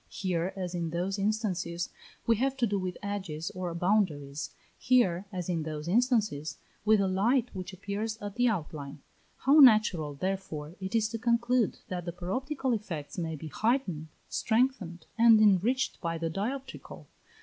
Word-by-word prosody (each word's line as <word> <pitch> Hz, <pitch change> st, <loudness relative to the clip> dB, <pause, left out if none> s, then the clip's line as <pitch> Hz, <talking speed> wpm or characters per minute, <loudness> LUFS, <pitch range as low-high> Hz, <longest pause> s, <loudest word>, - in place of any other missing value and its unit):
Here, 180 Hz, -1 st, -1 dB
as 185 Hz, -2 st, -4 dB
in 170 Hz, -2 st, -2 dB
those 180 Hz, +4 st, -2 dB
instances, 190 Hz, -5 st, -1 dB, 0.4 s
we 230 Hz, -2 st, +3 dB
have 270 Hz, +3 st, 0 dB
to 250 Hz, -, +2 dB
do 200 Hz, -2 st, 0 dB
with 185 Hz, -1 st, -4 dB
edges 185 Hz, -6 st, -4 dB
or 185 Hz, -1 st, -4 dB
boundaries; 165 Hz, -7 st, 0 dB, 0.3 s
here, 205 Hz, -7 st, +3 dB
as 180 Hz, -3 st, -4 dB
in 170 Hz, -3 st, 0 dB
those 155 Hz, 0 st, -5 dB
instances, 205 Hz, -, +1 dB, 0.3 s
with 215 Hz, 0 st, +5 dB
a 195 Hz, -, +2 dB
light, 230 Hz, +7 st, +2 dB
which 185 Hz, -1 st, -6 dB
appears 200 Hz, +4 st, -4 dB
at 205 Hz, -1 st, -6 dB
the 245 Hz, +3 st, +2 dB
outline. 150 Hz, -, -3 dB, 0.4 s
How 285 Hz, +4 st, +7 dB
natural, 215 Hz, -, +6 dB
therefore, 170 Hz, -3 st, -4 dB
it 190 Hz, +3 st, -4 dB
is 220 Hz, -1 st, +3 dB
to 230 Hz, 0 st, -4 dB
conclude 235 Hz, 0 st, +2 dB
that 180 Hz, -2 st, -4 dB
the 170 Hz, -, -4 dB
paroptical 255 Hz, -, -2 dB
effects 175 Hz, -7 st, -5 dB
may 160 Hz, -2 st, -2 dB
be 155 Hz, +1 st, -7 dB
heightened, 210 Hz, -, 0 dB, 0.2 s
strengthened, 220 Hz, -8 st, 0 dB
and 230 Hz, -1 st, +8 dB
enriched 215 Hz, +6 st, +3 dB
by 165 Hz, -1 st, -2 dB
the 165 Hz, 0 st, -2 dB
dioptrical. 250 Hz, +10 st, -5 dB
195 Hz, 160 wpm, -29 LUFS, 170-225 Hz, 0.4 s, and